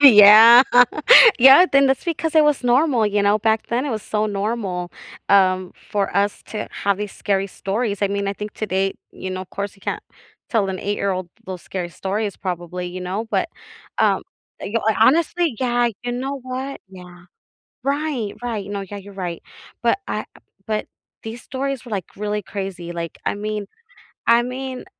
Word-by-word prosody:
Yeah, 225 -1 +9 0.8
yeah 270 +8 +8
then 275 0 +5
that's 265 -1 0
because 325 -1 -2
it 310 -1 +6
was 295 -3 +1
normal, 245 -2 +3
you 205 0 0
know, 205 +1 +3
back 220 +1 0
then, 240 +3 -1
it - - -2
was 220 -3 -3
so 215 0 -1
normal, 200 -4 -3 0.4
um, 185 -2 +3 0.2
for 200 -3 -1
us 200 +1 0
to 215 - -5
have 200 -1 +1
these 210 -1 -5
scary 195 -1 -1
stories 205 +2 -3
I 200 - +2
mean, 200 0 -2
I - - -1
think 210 +1 -7
today 195 -2 -1 0.2
you 185 - -7
know, 185 0 -4
of 185 - -15
course, 200 0 -5
you - - -23
can't - - -4 0.5
tell 210 -4 +1
an 190 -1 -4
eight-year-old 195 -3 -2 0.2
those 185 -2 -7
scary 180 -2 -5
stories 200 +4 -3
probably, 180 -1 -5
you 180 +1 -7
know, 190 +5 -4
but, - - 0 0.5
um, - - +2 0.4
you 225 +3 -2
ho 220 - +3
honestly 320 +2 +3
yeah, 245 -1 +2
you 245 0 -3
know 270 +3 -4
what, 260 +2 -5
yeah. 180 -2 -13 0.6
Right, 275 -6 -2
right, 225 -5 -4
no, 200 -1 -3
yeah, 195 +1 -8
you're 200 +1 -12
right, 180 -3 -5 0.4
but, 235 +9 +2
I - - -3 0.4
but, 215 -1 -2 0.4
these 225 +2 -7
stories 270 -1 -4
were, 240 - -10
like, 195 -5 -3
really 210 +1 -3
crazy, 190 -3 -6
like, 170 -1 -6
I - - +1
mean 210 0 -4 0.6
I 235 +1 +5
mean, 255 +1 -6
210 Hz, 180 wpm, -21 LUFS, 195-245 Hz, 0.8 s, Yeah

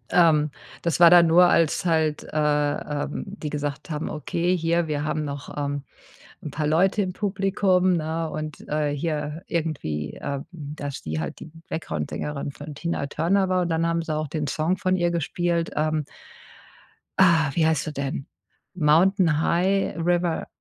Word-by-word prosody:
Ähm, 155 -4 +5 0.3
das 170 0 0
war 170 -1 +9
dann 175 -1 +8
nur 170 +2 +6
als 165 +3 +2
halt 160 -3 +1
äh, 150 -1 +1 0.3
ähm, - - -4
die 190 -7 -6
gesagt 145 0 -4
haben: 150 0 -3
„Okay, 170 +4 -1
hier, 170 0 +1
wir 150 -1 -1
haben 155 0 -1
noch, 140 -1 -6
ähm, 145 -1 -2 0.6
'n 150 - -4
paar 150 +2 -2
Leute 185 +7 +3
im 185 - -4
Publikum“, 190 -2 +1
ne? 160 +1 -2
Und, 155 -1 -6
äh, 150 -1 0
hier 150 +1 -3
irgendwie, 140 - -3
ähm, 140 -1 -4
dass 145 -4 -6
die 80 0 -3
halt 75 - -5
die 160 - -10 0.2
Backgroundsängerin 145 - -4
von 145 +2 -9
Tina 170 -2 -2
Turner 185 +7 +1
war 185 -1 +2
und 175 - -2
dann 165 0 +1
haben 165 0 0
sie 160 -2 -3
auch 155 0 -2
den 150 0 -3
Song 165 +4 0
von 185 -1 +1
ihr 175 -1 +1
gespielt, 170 +1 -1
ähm. 155 -1 0 1.1
Ah, 165 -6 +5
wie 165 - +2
heißt 160 -1 +1
er 150 - -4
denn? 140 0 -3 0.5
„Mountain 165 0 +3
High 190 +4 +1
River 175 0 0
160 Hz, 165 wpm, -24 LUFS, 150-175 Hz, 1.1 s, war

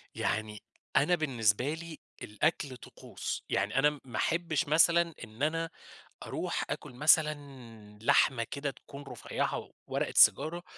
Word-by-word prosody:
يعني 105 -1 -2 0.3
أنا 165 +6 +4
بالنسبة 125 -4 +1
لي 165 -1 -8 0.2
الأكل 135 +3 -1
طقوس، - - -7
يعني 105 +6 +1
أنا 150 +1 +2
ما 120 -4 -6
أحبش 165 -4 0
مثلًا 170 +2 +4
إن 115 +3 -8
أنا 165 +2 0 0.5
أروح - - -3
آكل - - -5
مثلًا 150 +3 +4 0.7
لحمة 115 +1 +3
كده 140 0 -3
تكون 140 +1 -12
رفيعة 135 - -4 0.2
ورقة - - -2
سيجارة، 170 +3 +5
145 Hz, 120 wpm, -30 LUFS, 125-160 Hz, 0.7 s, سيجارة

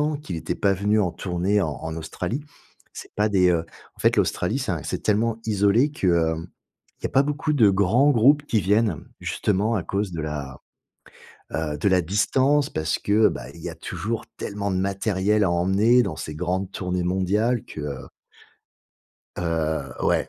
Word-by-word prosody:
ans 150 0 0
qu'il 140 -11 -7
était 80 - -3
pas 100 - +2
venu 100 +3 +1
en 90 -4 0
tournée 95 +3 0
en 80 - 0
en 80 0 -5
Australie. 90 - -4 0.5
C'est - - -11
pas 105 +1 +2
des, 95 -3 +4
heu 85 -2 +1 0.3
en - - -27
fait, - - +3
l'Australie, - - +1
c'est - - -2
un - - -3
c'est - - -3
tellement 110 +2 +1
isolé 110 +7 +3
que, 100 - -2
heu, 80 -2 +2 0.7
il - - -26
y - - +1
a - - -12
pas 135 - +4
beaucoup 150 +2 -1
de 115 -8 +5
grands 110 +9 +3
groupes 145 +5 +4
qui 110 -7 +1
viennent. 105 -3 +2 0.2
Justement 105 +3 0
à 95 - 0
cause 100 +2 -2
de 80 - -4
la, 75 -3 -5 0.9
heu, 75 -2 -2
de 100 - +1
la 95 -1 +4
distance. 130 - +2
Parce 80 0 -1
que, 105 +2 +4
bah, 60 +2 -7
il 85 - -12
y - - -4
a - - -8
toujours 115 +1 -4
tellement 100 0 -3
de 95 - 0
matériel 100 +2 +1
à 90 - +2
emmener 100 +8 +3
dans - - -3
ces 75 - -6
grandes 90 +3 -2
tournées 90 -1 -2
mondiales 100 +7 +1
que, 75 - -8
heu 70 -2 -6 1.3
Heu 80 -6 -1
ouais, - - +1
100 Hz, 190 wpm, -24 LUFS, 85-110 Hz, 1.3 s, de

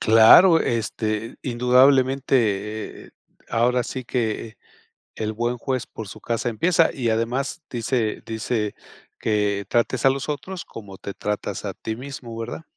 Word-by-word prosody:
Claro, 135 +11 +7
este 110 -1 -2
indudablemente, 125 -4 +2
eh, - - -18 0.4
ahora 125 +2 +2
sí 130 +1 -6
que 115 -2 -2 0.6
el 110 0 -3
buen 120 +2 -1
juez 130 0 -2
por 110 - -8
su - - -10
casa 120 +1 -1
empieza. 165 +8 +3
Y 120 -4 -1
además 125 +8 -1
dice 115 -2 -1
dice, 110 -1 -2 0.4
que 105 -2 0
trates 120 +1 +1
a - - +8
los 135 +2 -2
otros 170 +5 -5
como 100 -4 -10
te 100 0 -7
tratas 105 +1 -3
a - - -3
ti 110 - -5
mismo, 125 -3 -8
¿verdad? 115 +7 -6
115 Hz, 140 wpm, -23 LUFS, 110-130 Hz, 0.6 s, a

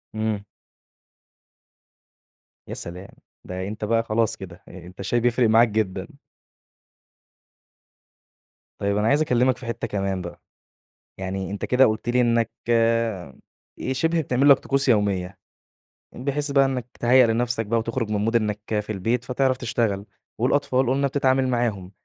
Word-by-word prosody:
إمم. 110 -2 -2 2.2
يا - - -6
سلام، 90 +3 -7 0.4
ده 90 +1 -5
أنت 105 +1 -5
بقى 115 +1 +1
خلاص 115 0 0
كده، 95 -1 -11
أ 90 -1 -11
أنت 90 +2 -14
الشاي 110 +5 0
بيفرق 120 -1 +2
معاك 115 +2 +6
جدًا. 105 -3 -2 2.7
طيب 100 0 0
أنا 105 - +1
عايز 145 +5 +3
أكلّمك 125 -3 +2
في 125 - -11
حتّة 115 0 -3
كمان 95 -2 -2
بقى، 85 -1 -9 0.8
يعني 95 0 -4
أنت 100 - -4
كده 130 +1 +4
قلت 110 +2 -1
لي 125 +1 +3
إنّك 115 -1 +2 0.2
آآ، 115 - +1 0.6
شبه 165 +5 +1
بتعمل 135 0 +2
لك 140 - +7
طقوس 135 0 0
يوميّة، 100 -4 +1 0.8
بحيث 140 +3 -2
بقى 140 -1 +5
إنّك 130 -3 -2
تهيأ 125 +1 +5
لنفسك 115 0 0
بقى 115 +2 +1
وتخرج 115 0 -3
من 105 - 0
مود 115 +2 0
إنك 105 -2 +1 0.2
في 105 - -7
البيت، 115 +5 -1
فتعرف 130 0 0
تشتغل، 115 -5 -1 0.3
والأطفال 130 +1 +1
قُلنا 140 +2 +2
بتتعامل 130 -1 +1
معاهم، 115 -7 -1
115 Hz, 140 wpm, -23 LUFS, 100-125 Hz, 2.7 s, لك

